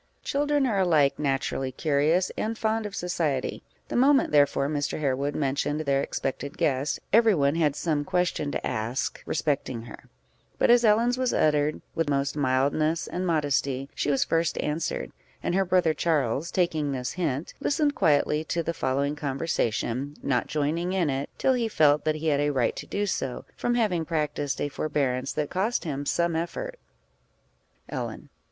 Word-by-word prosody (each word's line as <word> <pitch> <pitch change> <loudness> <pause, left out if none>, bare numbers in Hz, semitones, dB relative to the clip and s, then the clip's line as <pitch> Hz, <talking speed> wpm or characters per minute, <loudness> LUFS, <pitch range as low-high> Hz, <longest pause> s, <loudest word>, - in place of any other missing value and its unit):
Children 290 0 +1
are 215 -6 +1
alike 155 -7 +3
naturally 135 -2 -1
curious 155 +6 +1
and 225 +1 -2
fond 220 0 0
of 200 - -9
society; 165 -7 -1 0.3
the - - -3
moment, 270 +2 +4
therefore, 145 -1 +3
Mr. 145 0 -2
Harewood 140 0 -1
mentioned 145 +1 0
their 140 -2 +1
expected 140 +1 -4
guest, 135 +1 0
every 225 -2 +6
one 140 -2 +2
had 155 -4 +1
some 150 -2 0
question 180 -4 0
to - - -3
ask 115 +4 -2
respecting 140 -6 -1
her; 120 - -12 0.5
but - - +4
as 240 0 +6
Ellen's 235 +3 +3
was 255 -1 +1
uttered 150 0 +2
with 165 -2 -1
most 140 0 0
mildness 145 +4 +1
and 185 +1 -3
modesty, 140 -4 0
she - - -1
was 140 -2 +3
first 165 0 0
answered; 155 +1 -2 0.3
and - - 0
her 195 +1 +3
brother 180 -3 +3
Charles, 150 -1 0
taking 160 -5 0
this 125 -2 -3
hint, 160 -4 -2
listened 290 +1 +1
quietly 150 - +2
to 170 +1 -1
the 170 - -2
following 140 0 0
conversation, 140 -2 -2
not 125 -3 0
joining 160 +5 -1
in 175 -6 +1
it, 135 +1 -3
till 265 - +3
he 240 -3 0
felt 150 -7 +3
that 155 0 +2
he 155 +1 -1
had 145 -2 +2
a 145 0 +2
right 130 -5 +1
to - - -6
do 205 +1 -1
so, 135 -9 -3
from 240 - 0
having 205 -8 +1
practised 150 -3 -2
a - - 0
forbearance 135 -3 -1
that 150 -1 -2
cost 210 +6 0
him 145 -4 -4
some 170 -1 +1
effort. - - -4 1.1
_Ellen. - - -5
150 Hz, 170 wpm, -26 LUFS, 140-180 Hz, 1.1 s, every